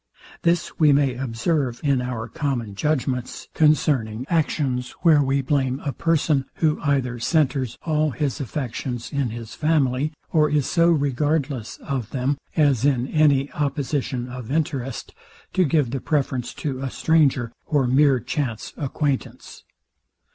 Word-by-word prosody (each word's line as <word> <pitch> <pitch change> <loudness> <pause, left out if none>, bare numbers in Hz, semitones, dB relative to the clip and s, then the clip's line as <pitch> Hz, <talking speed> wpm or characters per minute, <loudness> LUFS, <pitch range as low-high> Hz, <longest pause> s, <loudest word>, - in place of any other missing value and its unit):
This 170 0 0
we 155 -2 +6
may 140 -2 +3
observe 125 +1 -1
in 140 -3 +2
our 125 -3 -4
common 135 -9 -3
judgments 130 0 -2
concerning 130 -7 +2
actions, 140 -6 0
where 160 -4 +6
we 135 0 +1
blame 130 -1 0
a 140 - -3
person, 155 -4 +1
who 155 -2 +1
either 130 -4 0
centers 130 -3 +1
all 155 -1 +1
his 145 -3 -2
affections 125 -2 -4
in 140 -3 0
his 115 0 -7
family, 150 -2 +1 0.2
or 155 -2 +3
is 145 -2 +1
so 170 -1 +3
regardless 145 -4 0
of 130 -5 -4
them, 135 +2 -1 0.2
as, 145 -7 +3
in 130 -4 +2
any 145 -3 +3
opposition 140 -3 -2
of 125 -2 -8
interest, 140 -5 -2 0.4
to 185 - +3
give 145 -5 +1
the 135 -1 -3
preference 135 -5 -1
to 135 -4 -3
a 135 - -2
stranger, 135 -6 +2 0.2
or 145 -4 +2
mere 135 +1 +4
chance 120 -2 -3
acquaintance. 140 -1 -3
140 Hz, 140 wpm, -23 LUFS, 125-150 Hz, 0.4 s, we